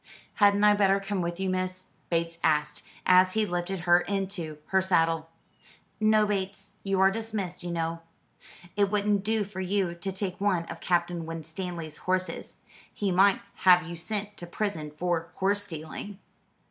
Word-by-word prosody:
"Hadn't 205 0 +4
I 210 0 +7
better 200 -1 +3
come 195 -1 -2
with 170 +1 -3
you, 190 - -1
miss?" 185 0 -2 0.2
Bates 165 0 -1
asked, 150 -1 +1 0.2
as 185 0 +6
he 220 -1 +2
lifted 175 0 -3
her 175 0 +5
into 190 -5 -3
her 190 0 +3
saddle. 165 -3 +1 0.7
"No, 215 0 +4
Bates. 195 -1 -3
You 195 -1 0
are 190 0 +6
dismissed, 215 -5 -4
you 175 - -5
know. 165 0 -2 0.7
It 200 -1 +3
wouldn't 205 -1 +1
do 220 0 +1
for 195 -1 -6
you 190 -1 0
to 175 +3 -5
take 190 -1 -4
one 185 -5 +1
of - - -8
Captain 175 -2 0
Winstanley's 165 0 -6
horses. 185 0 -2 0.4
He 200 -2 -1
might 195 +2 +4 0.2
have 180 -2 +5
you 170 - -6
sent 205 +4 -4
to 175 - -8
prison 170 -5 -3
for 165 +2 -2
horse 205 +1 +1
stealing." 165 +4 -7
185 Hz, 160 wpm, -28 LUFS, 170-200 Hz, 0.7 s, I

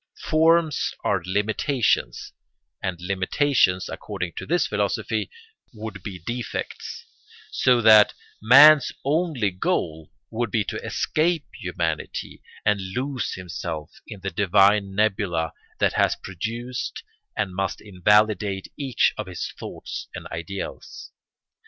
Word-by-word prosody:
Forms 160 -1 +2
are 100 -3 +1
limitations, 110 +6 0 0.5
and 90 -2 -3
limitations, 95 +2 +1
according 95 -5 -5
to - - -5
this 175 +1 +2
philosophy, - - -1 0.5
would 105 -2 -7
be 95 -1 -6
defects, 120 +5 -5 0.5
so 125 -2 +3
that 110 -1 +7 0.3
man's 140 +5 +8
only 145 - +1
goal 80 -3 -2 0.2
would 115 0 -1
be 105 +1 +1
to - - -5
escape 160 -1 0
humanity - - -4 0.2
and 105 -1 +2
lose 130 -3 -2
himself 85 -3 -6 0.2
in 105 -4 -9
the 95 0 -3
divine 100 +2 +3
nebula 95 -6 0 0.2
that - - +2
has - - +2
produced 115 +7 -5 0.3
and 100 -3 -1
must 95 0 -2
invalidate 105 0 +2
each 135 -4 +1
of 105 - -3
his 90 -2 -5
thoughts - - -7
and - - -7
ideals. 90 +4 -7
105 Hz, 115 wpm, -24 LUFS, 95-125 Hz, 0.5 s, man's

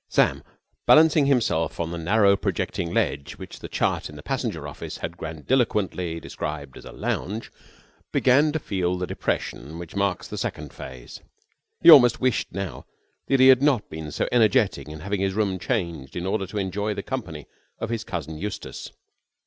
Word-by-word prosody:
Sam, - - +2 0.5
balancing 155 -2 +6
himself 100 - +1
on 85 -1 -2
the 85 - -4
narrow, 100 +4 +4
projecting 85 -3 -2
ledge 70 -4 -1
which - - -10
the - - -7
chart - - -1
in - - -11
the - - -10
passenger - - -3
office - - -7
had 85 - -5
grandiloquently 90 - -1
described 75 -4 -6
as - - -12
a - - -9
lounge, 110 +4 -3 0.6
began 140 +4 +4
to 160 - -1
feel 90 - -1
the 90 - -2
depression 80 -2 -3
which 85 +1 -9
marks 100 -2 0
the - - -6
second - - -4
phase. 65 -2 -10 0.6
He 170 - +11
almost 125 -6 +8
wished 130 -3 0
now 95 -5 -5 0.4
that 135 - +3
he 130 +1 +8
had 130 -1 +7
not 135 -7 +2
been 80 -1 -6
so 75 - -1
energetic 115 - +3
in 75 0 -8
having 100 +2 -2
his 95 -1 0
room 100 -3 0
changed 85 - -3
in 90 - -3
order 95 0 -1
to 105 - -6
enjoy 100 +2 -1
the 100 - -4
company 90 - -5 0.3
of 115 - -4
his 115 -1 -2
cousin 80 -6 -5
Eustace. 105 +3 -6
95 Hz, 175 wpm, -25 LUFS, 85-120 Hz, 0.6 s, He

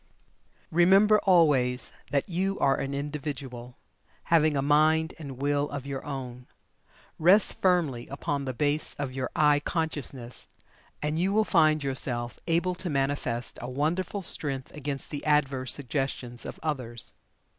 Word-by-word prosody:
Remember 195 +5 +5
always 145 -9 +3 0.2
that 140 +1 0
YOU 190 +2 -1
are 135 - +2
an 135 - -3
Individual, 140 -4 -6 0.5
having 155 -3 +3
a - - +1
mind 155 +2 +3
and 140 -5 -8
Will 145 +1 0
of 140 -2 -6
your 140 -1 -5
own. 125 -3 -7 0.7
Rest 185 +6 +4
firmly 165 -10 +1
upon 140 0 -3
the 130 - -3
base 145 +4 0
of 140 -3 -4
your 130 -1 -3
"I" 150 -1 +4
consciousness, 145 -6 -3 0.6
and 150 +2 -1
you 185 +3 +1
will 215 +1 +3
find 155 -5 +3
yourself 125 -3 -1
able 175 +2 +1
to 180 0 -5
manifest 135 -4 -2
a 120 - -5
wonderful 165 +8 -1
strength 135 -5 0
against 145 -1 -5
the 145 - -5
adverse 135 -4 +1
suggestions 130 -3 -2
of - - -8
others. 125 -7 0
145 Hz, 140 wpm, -27 LUFS, 130-160 Hz, 0.7 s, Remember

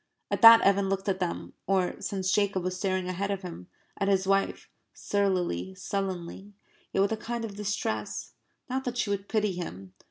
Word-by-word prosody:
At - - -1
that 230 -1 +11
Evan 195 0 +3
looked 195 +1 -2
at 190 -1 0
them, 180 -2 -3
or, 190 -2 +1
since 190 -2 -1
Jacob 200 -3 +1
was 185 0 -2
staring 185 -1 -1
ahead 185 +2 -2
of 200 -1 -2
him, 170 - -8 0.3
at 195 - +1
his 195 -1 +2
wife, 195 0 +1 0.3
surlily, 180 - -1
sullenly, 195 - -4 0.4
yet 195 - +2
with 200 - +2
a 220 - 0
kind 235 +1 -4
of 205 -3 -7
distress 200 - -3 0.3
not 260 +1 -2
that 245 -1 -3
she 210 - 0
would 200 0 -3
pity 210 -2 +1
him. 95 - -7
195 Hz, 185 wpm, -28 LUFS, 185-205 Hz, 0.4 s, that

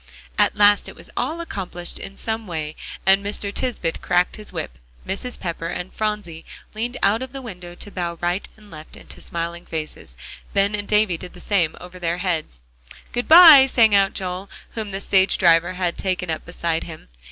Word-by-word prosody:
At 205 0 +3
last 205 -1 +4
it - - -12
was - - -13
all 335 +2 -2
accomplished 180 - -5
in 195 0 -9
some 225 -1 -3
way, 155 -3 -4 0.3
and 195 +1 +5
Mr. 205 0 -3
Tisbett 205 -11 -2
cracked 180 0 +1
his 210 -1 -9
whip, - - -6 0.3
Mrs. 240 +6 -3
Pepper 165 -2 -4
and 175 +1 -5
Phronsie 210 -7 -3 0.3
leaned 235 +4 -3
out 210 +4 +3
of 260 0 -6
the 270 - -6
window 180 -6 -9
to 205 - -7
bow 170 -3 -3
right 175 +3 -1
and 210 -1 -18
left 155 -1 -10
into - - -12
smiling 170 +1 -4
faces, 155 - -5 0.4
Ben 200 +1 +3
and 205 -1 -3
Davie 210 -5 +2
did 180 -1 -9
the 180 - -13
same 175 -4 +1
over 180 +1 -11
their 170 0 -1
heads. 165 - -3 0.5
"Good 245 0 -2
by," 320 -5 +10
sang 225 -5 +4
out 195 0 +4
Joel, 185 0 -4 0.2
whom 220 -2 -5
the 195 0 -4
stage 190 -1 +3
driver 170 0 +4
had 180 -2 -2
taken 185 -3 -1
up 160 - -4
beside 170 -1 -2
him. 160 - -10
190 Hz, 190 wpm, -22 LUFS, 170-210 Hz, 0.5 s, by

